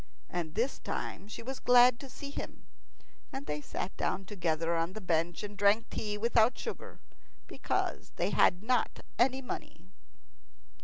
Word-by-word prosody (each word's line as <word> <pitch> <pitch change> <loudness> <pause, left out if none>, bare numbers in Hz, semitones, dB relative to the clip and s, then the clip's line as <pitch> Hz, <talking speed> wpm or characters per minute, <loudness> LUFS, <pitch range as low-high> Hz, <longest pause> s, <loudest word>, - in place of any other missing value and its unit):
And 170 -2 -3
this 240 +5 0
time 200 - -4
she 220 - -7
was 265 +2 -5
glad 245 0 +6
to 275 - -9
see 280 +3 -8
him, - - -7 0.7
and 270 +1 -5
they 150 0 -3
sat 185 - -4
down 195 - -1
together 170 -4 0
on 165 +2 0
the 215 - -5
bench 170 -2 0
and 205 0 -6
drank 205 +3 +3
tea 210 -1 -2
without 230 +2 +3
sugar, 460 - -6 0.5
because - - -2
they - - 0
had 180 +2 +4
not 245 0 +1 0.2
any 265 +2 +3
money. - - -7
210 Hz, 155 wpm, -32 LUFS, 180-245 Hz, 0.7 s, glad